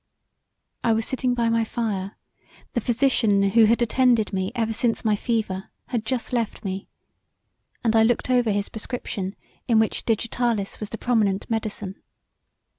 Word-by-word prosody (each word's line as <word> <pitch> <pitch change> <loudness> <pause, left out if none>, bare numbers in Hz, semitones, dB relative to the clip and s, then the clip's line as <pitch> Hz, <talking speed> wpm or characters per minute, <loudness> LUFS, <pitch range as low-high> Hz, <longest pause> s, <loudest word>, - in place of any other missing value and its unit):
I 230 - +3
was 225 0 0
sitting 255 -1 0
by 235 -1 +1
my 230 0 +2
fire, 215 -4 -3 0.6
the 240 - 0
physician 230 -4 +3
who 230 +1 +6
had 230 +2 +3
attended 235 -3 +3
me 190 +1 -1
ever 225 -2 0
since 230 +1 0
my 215 -1 +3
fever 210 -4 -2 0.2
had 230 -3 -2
just 255 -1 -2
left 230 -3 -2
me, 190 0 -4 1.0
and 225 -1 +2
I 225 - +6
looked 230 +1 +2
over 245 -2 +3
his 205 -1 0
prescription 210 -4 -4 0.3
in 230 - +4
which 220 0 +2
digitalis 230 -2 -1
was 210 - -5
the 225 - -5
prominent 215 -6 +1
medecine. 210 -3 -3
225 Hz, 155 wpm, -24 LUFS, 205-240 Hz, 1.0 s, who